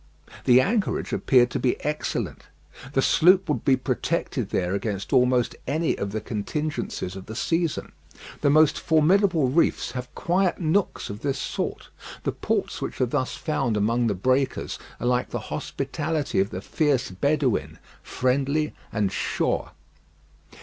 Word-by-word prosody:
The 125 0 +7
anchorage 205 - 0
appeared 125 -2 +4
to - - -1
be 125 - +1
excellent. 150 0 -3 0.5
The 135 - +2
sloop 185 +3 +5
would 150 - -1
be 135 - +4
protected 130 - -2
there 90 0 0
against 100 -1 -3
almost 125 -1 +3
any 155 +5 +1
of 100 0 -4
the 110 - -2
contingencies 110 -2 -3
of 95 -1 -9
the 110 - -7
season. 165 +4 -1 0.5
The 145 - +3
most 155 +1 +5
formidable 160 -1 +3
reefs 160 +6 +1
have 125 0 -6
quiet 180 +1 +1
nooks 175 - 0
of 100 - -7
this 140 -2 -1
sort. - - -4 0.3
The - - 0
ports - - -2
which - - -4
are 130 - +3
thus 130 0 -1
found 130 -5 -1
among 115 +3 +2
the 105 - 0
breakers 130 +7 0 0.2
are - - -4
like 125 0 +1
the - - -3
hospitality 155 -9 -2
of 100 +1 +2
the 95 - -5
fierce 140 -3 0
Bedouin 140 +4 0 0.2
friendly 140 +4 0 0.2
and 105 -4 0
sure. - - -1
130 Hz, 150 wpm, -25 LUFS, 115-155 Hz, 0.5 s, The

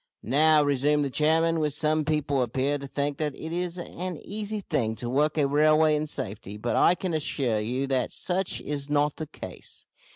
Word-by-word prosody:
"Now," 150 +4 +4
resumed 145 +1 +2
the 135 - -3
chairman, 160 +1 +2
"some 155 +1 +1
people 145 -3 0
appear 135 +4 0
to 140 - -7
think 140 +1 -2
that 150 -3 -1
it 160 - -7
is 180 0 -2
an 180 0 -5
easy 210 +1 -4
thing 120 - -1
to 120 - -5
work 150 +5 +1
a 145 -2 +3
railway 155 +2 +4
in 150 +1 -1
safety, 105 -5 -5
but 120 +3 -2
I 175 - +5
can 180 -1 -3
assure 135 -7 0
you 125 +6 -1
that 135 -2 0
such 185 +1 -1
is 145 -1 -4
not 145 0 +1
the 155 - -5
case. - - -9
150 Hz, 190 wpm, -26 LUFS, 135-160 Hz, -, I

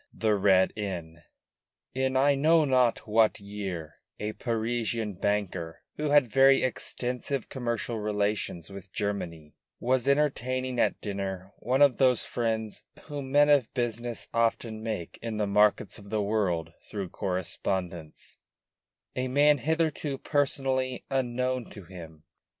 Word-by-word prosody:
THE 110 -1 +1
RED 95 -2 +4
INN 85 -6 -5 0.7
In 130 0 0
I 140 +2 +5
know 155 +3 +4
not 125 -5 +2
what 110 0 +3
year 95 -6 -6 0.2
a 105 +1 -3
Parisian 115 -2 -2
banker, 95 -4 -2
who 150 0 -1
had 145 -3 +5
very 135 +4 +5
extensive 125 +1 -2
commercial 120 -3 -3
relations 105 -4 -2
with 100 -1 -10
Germany, 85 -7 -4 0.3
was 130 +1 +1
entertaining 130 -3 +1
at - - +2
dinner 95 -1 -4
one 130 +5 +3
of 140 -4 +4
those 130 -3 +3
friends 110 -3 -2 0.2
whom 140 -3 -6
men 145 +1 +5
of 140 -6 +4
business 120 -1 -2
often 115 -1 0
make 110 -7 -5
in 115 -2 -4
the 105 - +1
markets 105 +1 +2
of 100 -1 -13
the 110 0 0
world 90 -6 0 0.2
through 100 -4 -4
correspondence; 90 -3 -4 0.8
a 130 0 -1
man 145 +2 +4
hitherto 155 -2 0
personally 130 -3 0
unknown 130 -1 -1
to 100 - -11
him. 80 -3 -11
115 Hz, 130 wpm, -28 LUFS, 100-130 Hz, 0.8 s, I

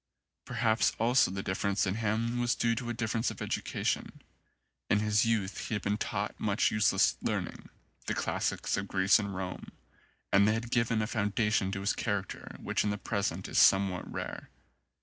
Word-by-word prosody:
Perhaps 115 -1 +1
also 120 +4 +4
the 95 +1 -4
difference 100 +2 0
in 95 - 0
him 115 +3 -1
was 120 -1 +1
due 115 0 +1
to 120 +1 -4
a - - -1
difference 115 0 -1
of - - -8
education. - - -2 0.7
In 105 - +4
his 105 +1 +2
youth 110 -4 -1
he 110 - -2
had 105 - -4
been 105 +1 0
taught - - -3
much 105 -1 +1
useless 95 -2 +3
learning, - - -3 0.4
the - - 0
classics - - -1
of 100 0 -3
Greece 95 +2 +4
and 100 -2 -4
Rome, 95 -1 -5 0.6
and 100 +1 +6
they 110 - +3
had 115 +1 -4
given 115 -2 +2
a - - 0
founda 105 0 0
tion 95 -3 +1
to 95 - -3
his 100 - +1
character 100 -4 -3
which - - -1
in 105 - 0
the 105 - -1
present 100 -4 -2
is - - +1
some 95 0 +6
what 90 -1 -6
rare. - - -6
105 Hz, 190 wpm, -30 LUFS, 100-115 Hz, 0.7 s, and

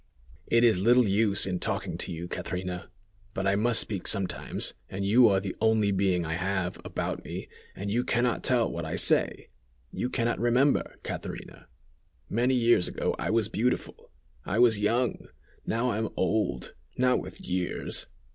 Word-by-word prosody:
"It 115 +1 +3
is 110 -6 +4
little 120 +2 +5
use 100 0 +2
in 90 -2 -2
talking - - -2
to - - -1
you, 85 +1 -5
Catrina: 90 0 -5 0.5
but 95 - -2
I 100 0 +3
must 115 +3 +4
speak 100 -4 -1
sometimes, 100 -3 -1 0.2
and 100 +1 -4
you 115 +3 +6
are 95 -1 +3
the 95 -1 -5
only 110 -2 +3
being 95 -3 +1
I 80 - -2
have, 95 +1 -2
about - - -4
me, - - -6 0.3
and 100 +1 -4
you 120 +3 +1
can 120 -1 +1
not 125 -2 0
tell 120 -3 +3
what 85 - -5
I 80 +2 -3
say. 95 - +2 0.4
You 125 - -3
can 120 -2 -1
not 120 - 0
remember, 125 +4 +2
Catrina! - - -7 0.6
Many 125 +4 +2
years 120 -6 +4
ago - - -2
I - - -2
was 110 -2 +2
beautiful; 115 +4 -2 0.3
I 100 - -2
was 115 -3 +5
young. 115 +4 0 0.4
Now 120 +3 0
I 110 - -2
am 110 - -1
old, 105 +4 -1 0.2
not 125 0 +3
with 95 -1 -10
years! 90 -1 -2
105 Hz, 175 wpm, -28 LUFS, 95-120 Hz, 0.6 s, you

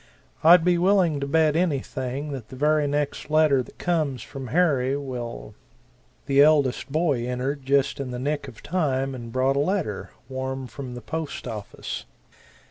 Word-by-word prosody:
I'd 170 +1 +7
be 175 -1 +3
willing 180 -5 +3
to 140 - -3
bet 155 +1 +3
anything 140 -4 -1
that 130 -6 -6
the - - -9
very 150 +2 +2
next 145 +1 -2
letter 155 -3 +4
that - - -12
comes 155 -8 -1
from 135 -2 -8
Harry 140 -3 +2
will 120 - -6 0.4
" - - -36
The 140 0 +4
eldest 145 -3 +3
boy 145 -6 +1
entered 130 +2 -3
just 140 0 +2
in 135 -2 -3
the 125 - -4
nick 145 +2 -2
of 120 -4 -12
time 135 -6 0
and 120 -3 -7
brought 130 +3 +1
a - - +3
letter, 145 - -1 0.2
warm 130 0 -4
from 125 -1 -8
the 120 - -7
post 160 -3 -5
office. 110 -4 -6
140 Hz, 170 wpm, -25 LUFS, 130-155 Hz, 0.4 s, I'd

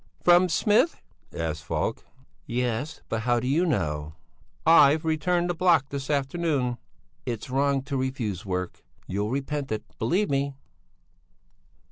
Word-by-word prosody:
"From 175 +1 +6
Smith?" 215 - +2 0.3
asked 80 -1 -3
Falk. - - -2 0.4
"Yes; 125 +4 -2
but 115 - -2
how 120 +1 +2
do 125 - -3
you 165 +7 +2
know?" 75 - -1 0.5
"I've 160 -1 +6
returned 175 +3 +1
the 175 - 0
block 170 -5 +3
this 140 -1 -5
afternoon." 140 -3 0 0.5
"It's 120 +1 -4
wrong 140 0 +1
to 135 0 -3
refuse 130 -8 -2
work. 90 -2 -4 0.2
You'll 100 +3 -2
repent 140 +1 -3
it! 110 -1 -2 0.2
Believe 200 +2 +1
me." 140 0 0
135 Hz, 130 wpm, -26 LUFS, 115-160 Hz, 0.5 s, From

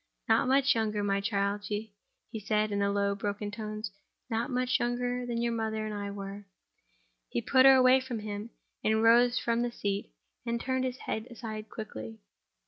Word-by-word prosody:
"Not - - +4
much 275 +1 +4
younger, 215 -2 0
my 200 0 +1
child," 200 0 -1
he 210 0 -4 0.5
said, 215 0 +1
in 200 - 0
low, 200 0 +1
broken 205 +1 -3
tones—"not 215 +2 -5
much 255 0 +1
younger 245 +1 -1
than 235 -1 -2
your 235 0 0
mother 220 -1 -2
and 215 - -4
I 205 -1 -4
were." 200 0 -7 0.8
He - - -1
put 260 - +5
her 270 - +9
away 255 0 +6
from 255 -3 -5
him, 210 +1 -5 0.3
and 220 +1 +2
rose 240 +2 +6
from 235 0 +1
the 240 0 -1
seat, 200 -3 -3 0.3
and 235 -1 -1
turned 260 +1 -1
his 255 0 -3
head 220 +2 -3
aside 220 -3 -7
quickly. 110 - -7
220 Hz, 170 wpm, -30 LUFS, 205-245 Hz, 0.8 s, her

